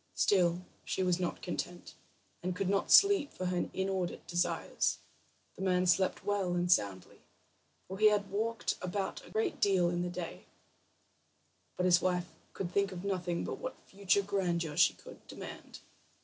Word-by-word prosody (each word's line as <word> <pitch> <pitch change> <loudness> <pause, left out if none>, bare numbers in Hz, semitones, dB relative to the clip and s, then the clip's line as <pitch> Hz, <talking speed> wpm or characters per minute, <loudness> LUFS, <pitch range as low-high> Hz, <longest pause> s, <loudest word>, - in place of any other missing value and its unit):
Still 180 -2 +2 0.2
she 190 - -1
was 180 -1 +1
not 180 -2 -3
content, 175 0 -5 0.5
and 180 0 -2
could 190 0 -1
not 195 - 0
sleep 395 -8 +6
for 185 - -5
her 180 -1 -1
inordinate 190 -2 -2
desires. 175 0 0 0.6
The - - -10
man 185 -1 +2
slept 185 +1 +2
well 195 -3 0
and 175 0 +1
soundly, 100 - 0 0.7
for 190 - -7
he 215 - +7
had 205 -2 0
walked 225 +2 -1
about 190 +2 -3
a - - -14
great 220 - -1
deal 185 -4 +3
in 175 0 -1
the 180 - -2
day; 175 -1 -7 1.3
but 180 - +1
his 180 0 +5
wife 180 -2 -1 0.2
could 175 -2 -4
think 200 +1 +1
of 185 +1 -7
nothing 180 -3 -1
but - - -5
what 255 - -5 0.2
further 200 0 +2
grandeur 175 -6 -1
she 175 - +4
could - - -14
demand. - - -9
185 Hz, 165 wpm, -32 LUFS, 175-195 Hz, 1.3 s, he